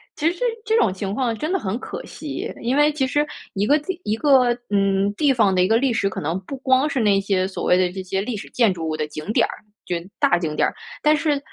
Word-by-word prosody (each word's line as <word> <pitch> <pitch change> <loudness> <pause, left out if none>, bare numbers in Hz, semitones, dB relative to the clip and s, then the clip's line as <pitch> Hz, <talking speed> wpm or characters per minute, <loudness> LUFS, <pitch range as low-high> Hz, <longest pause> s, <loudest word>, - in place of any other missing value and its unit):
其 320 +3 +1
实 - - -14 0.3
这 440 +1 +2
种 205 - +3
情 195 +1 -4
况 235 -2 -1
真 310 +7 -3
的 385 - +1
很 200 - -2
可 - - -7
惜， 300 -3 -6
因 245 +3 +1
为 295 +1 +4
其 290 -3 0
实 290 +3 +1 0.3
一 205 0 0
个 290 - +5
地 345 +4 -5
一 210 - 0
个， 255 0 +4 0.2
嗯， 195 0 +2
地 285 +6 +2
方 220 -7 +3
的 185 - +3
一 180 - +3
个 225 +3 +4
历 255 0 +1
史， 200 -3 +1
可 - - -5
能 165 +5 -2
不 270 +8 -7
光 260 +2 +2
是 275 - -1
那 200 -2 +3
些 195 -2 0
所 190 - -6
谓 180 - +4
的 180 -1 +2
这 190 +1 -5
些 190 +1 -2
历 220 +4 -3
史 205 - -8
建 230 -6 +2
筑 165 -2 -5
物 155 - -2
的 155 -1 -2
景 155 +6 -6
点 - - +3
儿， - - -8 0.2
就 180 - -2
是 170 +2 -6
大 175 - +3
景 160 -3 -3
点 - - +3
儿。 - - -5 0.3
但 300 0 +5
是 295 -2 0
215 Hz, 295 characters per minute, -22 LUFS, 190-275 Hz, 0.3 s, 个